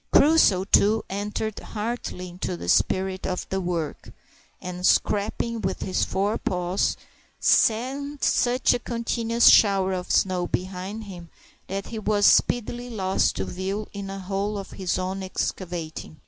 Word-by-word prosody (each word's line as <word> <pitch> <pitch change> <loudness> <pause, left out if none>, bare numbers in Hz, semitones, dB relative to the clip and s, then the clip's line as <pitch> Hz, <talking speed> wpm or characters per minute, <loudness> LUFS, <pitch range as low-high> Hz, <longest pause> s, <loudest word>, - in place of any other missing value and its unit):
Crusoe, 285 - +5
too, 210 +3 +3
entered 210 +2 -3
heartily 210 -4 -5
into 175 - -4
the 85 0 -7
spirit 190 - +1
of 185 - -3
the 190 0 -1
work, 170 -4 -4 0.5
and, 180 0 -7
scraping 215 +4 +1
with 190 0 -2
his 185 - 0
forepaws, 190 -2 -1 0.4
sent 270 +6 +1
such 250 +1 +3
a - - -1
continuous 235 0 +1
shower 195 -3 +5
of 180 -1 -4
snow 180 -2 +2
behind 190 +4 -4
him 175 -5 -10 0.4
that 195 +1 -4
he 225 - -5
was 210 -1 +1
speedily 245 +1 +2
lost 190 -5 0
to - - -2
view 195 +3 -4
in 200 -1 -6
a 195 - -5
hole 195 +2 -3
of 195 - -7
his 185 -2 -2
own 190 +1 -3
excavating. 175 -4 -4
195 Hz, 140 wpm, -25 LUFS, 185-220 Hz, 0.5 s, Crusoe